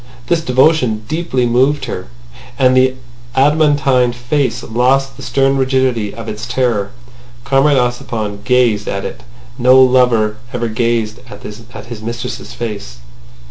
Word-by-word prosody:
This 165 Hz, +6 st, +1 dB
devotion 125 Hz, -5 st, +2 dB
deeply 155 Hz, -6 st, -1 dB
moved 130 Hz, +4 st, +2 dB
her—and 90 Hz, -, -3 dB
the 130 Hz, 0 st, +3 dB, 0.4 s
adamantine 140 Hz, -3 st, +3 dB
face 125 Hz, +3 st, -1 dB
lost 130 Hz, +3 st, +1 dB
the -, -, -12 dB
stern 135 Hz, 0 st, +1 dB
rigidity 130 Hz, -5 st, 0 dB
of 115 Hz, 0 st, -9 dB
its 110 Hz, +2 st, -5 dB
terror. 120 Hz, -5 st, 0 dB, 0.5 s
Comrade 140 Hz, +2 st, +3 dB
Ossipon 120 Hz, -5 st, -2 dB
gazed 120 Hz, -4 st, +2 dB
at 100 Hz, 0 st, -3 dB
it -, -, -6 dB
as -, -, -18 dB, 0.4 s
no 130 Hz, +2 st, +6 dB
lover 125 Hz, -5 st, +3 dB, 0.2 s
ever 120 Hz, -1 st, -2 dB
gazed 115 Hz, -1 st, -1 dB
at 105 Hz, -1 st, -11 dB
his 115 Hz, +1 st, -9 dB
mistress's 115 Hz, +2 st, -6 dB
face. 100 Hz, -, -6 dB
125 Hz, 130 wpm, -16 LUFS, 110-130 Hz, 0.5 s, no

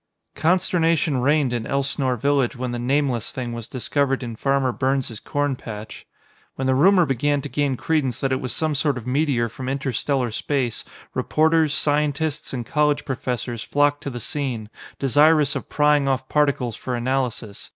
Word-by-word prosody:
] -, -, -52 dB
Consternation 165 Hz, -6 st, +2 dB
reigned 140 Hz, -1 st, +2 dB
in 115 Hz, -2 st, -2 dB
Elsnore 135 Hz, -2 st, 0 dB
village 140 Hz, 0 st, +1 dB
when 125 Hz, 0 st, -3 dB
the 120 Hz, -, -3 dB
Nameless 130 Hz, -2 st, 0 dB
Thing 120 Hz, -2 st, -5 dB
was 115 Hz, -1 st, -6 dB
discovered 135 Hz, +1 st, -1 dB
in 115 Hz, -2 st, -5 dB
Farmer 135 Hz, +1 st, +1 dB
Burns' 130 Hz, -3 st, -1 dB
corn 145 Hz, -1 st, -1 dB
patch. 110 Hz, -3 st, -9 dB, 0.5 s
When 135 Hz, -, -3 dB
the 130 Hz, -, +3 dB
rumor 180 Hz, +6 st, +5 dB
began 145 Hz, +2 st, +1 dB
to 145 Hz, -, -5 dB
gain 140 Hz, -3 st, 0 dB
credence 135 Hz, -6 st, 0 dB
that 135 Hz, -, -1 dB
it 130 Hz, -, 0 dB
was 130 Hz, -, -3 dB
some 155 Hz, -1 st, 0 dB
sort 145 Hz, -1 st, 0 dB
of 120 Hz, -, -7 dB
meteor 130 Hz, -3 st, +1 dB
from 130 Hz, +3 st, -6 dB
inter 135 Hz, 0 st, -2 dB
stellar 125 Hz, 0 st, 0 dB
space, 130 Hz, 0 st, -1 dB, 0.3 s
reporters, 160 Hz, 0 st, +2 dB
scientists 150 Hz, +1 st, 0 dB
and 125 Hz, -3 st, -4 dB
college 150 Hz, +2 st, +1 dB
professors 125 Hz, -3 st, -3 dB
flocked 145 Hz, 0 st, +1 dB
to 140 Hz, -, -4 dB
the 120 Hz, -2 st, -6 dB
scene, 120 Hz, -4 st, -3 dB, 0.3 s
desirous 145 Hz, +2 st, +4 dB
of -, -, -5 dB
prying 150 Hz, -1 st, +3 dB
off 130 Hz, -1 st, 0 dB
particles 140 Hz, -6 st, +1 dB
for 125 Hz, -, -4 dB
analysis. 120 Hz, -4 st, -2 dB
135 Hz, 170 wpm, -23 LUFS, 125-145 Hz, 0.5 s, rumor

